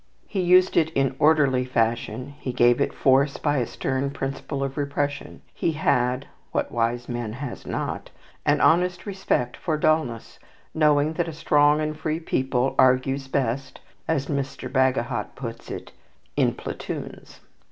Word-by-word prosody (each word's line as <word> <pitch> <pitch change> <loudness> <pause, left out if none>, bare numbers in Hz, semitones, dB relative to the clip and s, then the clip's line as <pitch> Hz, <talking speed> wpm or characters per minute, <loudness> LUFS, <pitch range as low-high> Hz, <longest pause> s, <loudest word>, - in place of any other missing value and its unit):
He 195 - -2
used 180 +1 +4
it 160 -1 +4
in 135 -1 +1
orderly 145 -4 +4
fashion; 125 +2 -1
he 130 - -3
gave 120 +1 +4
it - - +1
force 135 +1 +3
by 145 -1 0
a 120 - -1
stern 130 +1 -2
principle 135 0 -4
of 135 -1 -3
repression. 145 0 -3
He 165 - -1
had 125 -3 +1 0.3
(what - - -1
wise 120 +1 -1
man 120 -3 -4
has 130 +1 -7
not?) - - -3 0.3
an - - +2
honest 180 +2 +3
respect 190 - -1
for 160 -4 -2
dulness, 150 -7 0 0.3
knowing 150 -1 +3
that 170 +1 -1
a 165 - -5
strong 150 -1 +3
and 155 0 -2
free 155 +1 -2
people 130 -4 0
argues 130 +1 +3
best 135 0 -2 0.3
as 145 -4 0
Mr. 135 -2 -3
Bagehot 130 -4 0
puts 115 -3 -7
it - - -7 0.4
"in - - +2
platoons." - - -7
135 Hz, 150 wpm, -24 LUFS, 125-155 Hz, 0.4 s, used